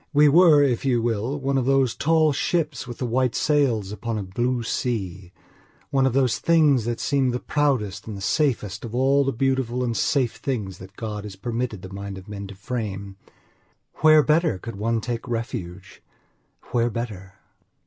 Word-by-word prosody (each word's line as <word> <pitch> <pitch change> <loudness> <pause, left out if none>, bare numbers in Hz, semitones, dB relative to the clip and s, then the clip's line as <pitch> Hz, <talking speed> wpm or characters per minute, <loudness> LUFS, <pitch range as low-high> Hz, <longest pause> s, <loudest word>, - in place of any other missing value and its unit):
We 150 +1 +6
were, 155 -2 +6
if 125 -5 +1
you 130 -3 +2
will, 115 +4 -1
one 135 0 0
of 125 - -1
those 135 -3 +3
tall 155 -1 +2
ships 155 -3 -1
with 120 - -7
the 125 - -3
white 125 +1 0
sails 125 -10 +1
upon 110 +2 -4
a 105 - -3
blue 120 +6 -1
sea, 95 -7 -3 0.6
one 135 -1 +3
of 130 - -1
those 130 -3 +2
things 150 -8 +3
that 120 -1 -2
seem 135 -2 +1
the 125 0 -2
proudest 130 -13 -1
and 105 -2 -5
the - - -8
safest 110 -4 0
of 120 -1 -6
all 135 +2 +3
the 135 - 0
beautiful 130 -1 0
and 120 -2 -1
safe 130 0 +1
things 105 -9 -4
that 95 +2 -12
God 105 -2 -5
has 105 -2 -8
permitted 115 0 -4
the 95 0 -9
mind 100 0 -6
of 95 - -11
men 100 -1 -6
to 100 - -10
frame. 100 -2 -5 0.8
Where 155 -1 +6
better 155 - +2
could 115 +4 -8
one 115 +3 -1
take 120 +1 -4
refuge? 105 -6 -5 0.7
Where 120 -1 +2
better? 105 -4 -6
120 Hz, 180 wpm, -24 LUFS, 105-135 Hz, 0.8 s, We